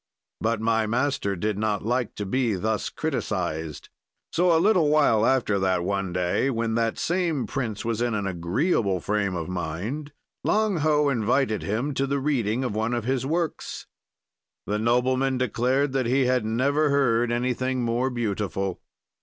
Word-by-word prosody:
"But 115 0 0
my 110 0 +1
master 125 -4 0
did 105 +3 -2
not 105 -2 -1
like 120 +1 -1
to 105 - -4
be 115 +1 0
thus 110 +3 -1
criticized. 80 -1 -3 0.4
"So, 180 +1 +3
a 165 - +5
little 175 -3 +4
while 115 -7 +4
after 115 -6 +2
that, 95 -2 +1
one 95 0 -1
day, 90 +9 0
when 115 -3 -1
that 115 0 0
same 170 -6 0
prince 110 -6 -3
was 115 -1 -1
in 120 -2 0
an 100 -2 -2
agreeable 95 - 0
frame 100 0 -1
of 85 -2 -3
mind, 95 - -4 0.3
Lang 215 -3 +2
Ho 150 -1 +2
invited 120 -2 +1
him 120 +8 -2
to 135 +1 0
the 140 +1 0
reading 130 -4 0
of 125 - -2
one 110 +3 0
of 120 - -2
his 130 0 0
works. 165 +1 -2 0.8
"The 105 +1 -1
nobleman 130 +3 +2
declared 130 +3 +1
that 130 -2 0
he 130 +2 +2
had 125 -3 +1
never 140 +7 +1
heard 120 -4 +2
anything 125 +1 -1
more 120 +3 0
beautiful. 100 -6 -2
120 Hz, 160 wpm, -25 LUFS, 105-135 Hz, 0.8 s, a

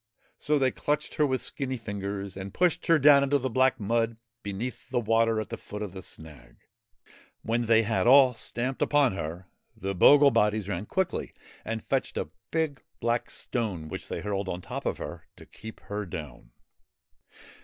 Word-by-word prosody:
So 150 0 +1
they 130 -2 +2
clutched 150 +3 -2
her 150 - +2
with 130 -1 -1
skinny 130 -2 -3
fingers 100 -3 -5
and 95 0 -7
pushed 180 -2 +1
her 165 -2 +6
down 145 -1 +7
into 140 +1 +2
the 130 -2 -3
black 130 +2 +3
mud 115 +2 0 0.2
beneath 115 +4 -5
the 125 -1 +1
water 115 0 +2
at 110 - -4
the - - -5
foot 105 +1 -7
of 100 - -5
the 95 - -7
snag. 75 -8 -11 0.9
When 115 +1 0
they 115 0 +5
had 110 +2 0
all 130 0 +7
stamped 120 +3 -3
upon 145 -6 +3
her, 90 0 -5 0.3
the 95 +1 -3
bogle 140 +9 +7
bodies 105 -3 +2
ran 100 +1 -3
quickly 190 -1 -2 0.3
and 110 0 -4
fetched - - -1
a - - -3 0.2
big 160 -4 -1 0.2
black 120 +1 0
stone 100 -10 -3
which - - -6
they - - -4
hurled 100 0 -2
on 90 - -3
top - - -5
of - - -1
her - - -8
to - - -14
keep 110 -1 -11
her 105 -1 -5
down. 75 -9 -8
115 Hz, 180 wpm, -28 LUFS, 100-130 Hz, 0.9 s, down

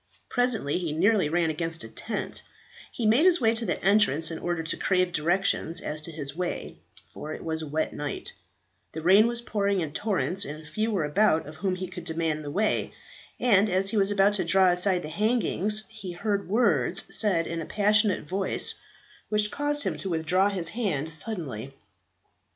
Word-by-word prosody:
Presently 245 - +1
he 165 -4 -3
nearly 185 0 +2
ran 165 0 +1
against 165 -1 -3
a - - -7
tent; 215 - -4 0.5
he 235 - -4
made 230 +8 +4
his 360 -1 +6
way 225 -3 +3
to 230 0 0
the - - -1
entrance 170 -6 +3
in 160 - -5
order 175 -2 -2
to 160 - -1
crave 185 -1 +1
directions 170 +1 +1
as 150 -1 -3
to 165 - -5
his 145 -2 -5
way 180 0 -4 0.3
for 155 - -7
it - - -10
was 160 -1 -2
a 155 - -6
wet 155 +2 -2
night; 145 0 -5 0.6
the 160 - -6
rain 195 +6 +6
was 235 0 -2
pouring 200 -4 0
in 160 -4 -3
torrents, 195 -2 0
and 155 -1 -8
few 215 +5 -1
were 195 -7 0
about 160 +1 +2
of 155 +2 -10
whom 190 +1 -1
he 185 0 -4
could 180 - -8
demand 160 -2 -2
the 145 - -6
way 210 +8 0 0.4
and, 210 -4 +4
as 190 +1 +1
he - - -3
was 195 -1 +3
about 205 0 +3
to 205 - -1
draw 185 +2 +4
aside 180 0 +1
the - - -5
hangings, 215 +2 0
he 215 -5 -8
heard 200 +1 -2
words 230 +4 +2
said 185 -6 +2
in 165 0 -4
a - - -5
passionate 210 -4 +2
voice 190 +2 0 0.6
which 210 0 +1
caused 290 0 -1
him - - -2
to 195 - -4
withdraw 180 +4 +2
his 180 -5 -1
hand 165 - -2
suddenly. 150 - -2
185 Hz, 190 wpm, -26 LUFS, 160-210 Hz, 0.6 s, his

